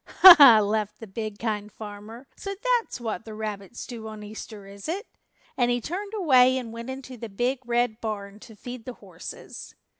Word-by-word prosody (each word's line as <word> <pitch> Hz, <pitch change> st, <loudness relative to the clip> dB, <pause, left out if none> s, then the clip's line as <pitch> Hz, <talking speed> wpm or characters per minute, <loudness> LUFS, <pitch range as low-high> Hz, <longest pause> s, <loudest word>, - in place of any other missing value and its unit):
"Ha, 375 Hz, -1 st, +12 dB
ha," 245 Hz, -6 st, +10 dB
laughed 210 Hz, 0 st, -1 dB
the 225 Hz, -, -8 dB
big 215 Hz, +1 st, -6 dB
Kind 210 Hz, -2 st, -3 dB
Farmer, 215 Hz, +4 st, -10 dB
"so 395 Hz, 0 st, -6 dB, 0.2 s
that's 455 Hz, -, -9 dB
what 225 Hz, -2 st, -4 dB
the 220 Hz, -1 st, -9 dB
rabbits 215 Hz, 0 st, -6 dB
do 230 Hz, -3 st, -8 dB
on 215 Hz, -1 st, -8 dB
Easter, 210 Hz, -1 st, -9 dB
is 200 Hz, +6 st, -9 dB
it?" 395 Hz, +7 st, -3 dB, 0.5 s
and 245 Hz, -1 st, +2 dB
he 245 Hz, 0 st, +1 dB
turned 395 Hz, -, -5 dB
away 260 Hz, -9 st, +5 dB
and 235 Hz, -3 st, -6 dB
went 230 Hz, +2 st, -7 dB
into 260 Hz, -1 st, -8 dB
the 230 Hz, 0 st, -7 dB
Big 245 Hz, +6 st, -1 dB
Red 240 Hz, -1 st, 0 dB
Barn 205 Hz, -2 st, -5 dB
to 220 Hz, -, -14 dB
feed 245 Hz, +2 st, -9 dB
the 255 Hz, -, -6 dB
horses. -, -, -10 dB
225 Hz, 190 wpm, -26 LUFS, 210-250 Hz, 0.5 s, Ha